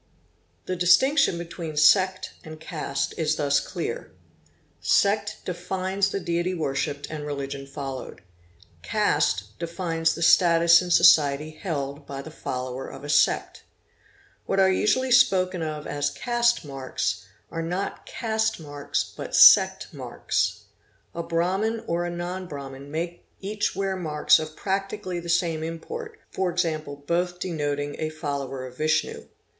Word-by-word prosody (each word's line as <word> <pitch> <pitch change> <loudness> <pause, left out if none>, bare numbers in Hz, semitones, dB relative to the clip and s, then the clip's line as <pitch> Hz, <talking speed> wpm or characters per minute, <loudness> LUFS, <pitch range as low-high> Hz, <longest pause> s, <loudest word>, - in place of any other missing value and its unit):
The 185 - -2
distinction 180 - +4
between 165 -2 -6
sect 185 +5 +4
and 155 0 -10
caste 140 -4 -3
is 155 -1 +1
thus 140 -2 +2
clear. - - -5 0.7
Sect 205 +1 +2
defines 190 +2 -1
the 195 - -2
deity 175 +1 -1
worshipped 140 -2 -2
and 155 -1 -5
religion 140 -1 -5
followed. 135 -5 -7 0.6
Caste 100 +1 0
defines 165 -1 -1
the 165 - -3
status 170 0 +6
in 180 - -5
society 150 -3 +5
held 145 -4 -5
by 140 0 -6
the 160 - -10
follower 130 -2 -5
of - - -10
a 145 - -7
sect. 145 -1 +2 0.9
What 195 - +1
are 190 0 +5
usually 255 +7 +1
spoken 185 -8 +4
of 155 -1 -4
as 145 0 -1
caste 240 +4 +1
marks 135 -2 -3 0.2
are 165 - -3
not 180 +4 -4
caste 220 -3 -1
marks 145 -2 -3
but - - -5
sect - - +7
marks. - - -2 0.5
A 170 - -3
Brahmin 190 +7 0
or 170 -2 -1
a - - -2
non 175 +2 -5
Brahmin 140 -2 -8
may 170 +3 -4 0.2
each 205 +1 -2
wear 195 0 -1
marks 155 -5 +3
of 155 0 -6
practically 195 -1 -3
the 170 0 -8
same 170 -2 +1
import, 435 - -6 0.2
e.g., 175 -3 0 0.3
both 175 +2 -1
denoting 145 -5 -3
a 155 - -1
follower 140 -4 -4
of 125 0 -11
Vishnu. 155 0 0
170 Hz, 135 wpm, -25 LUFS, 145-185 Hz, 0.9 s, sect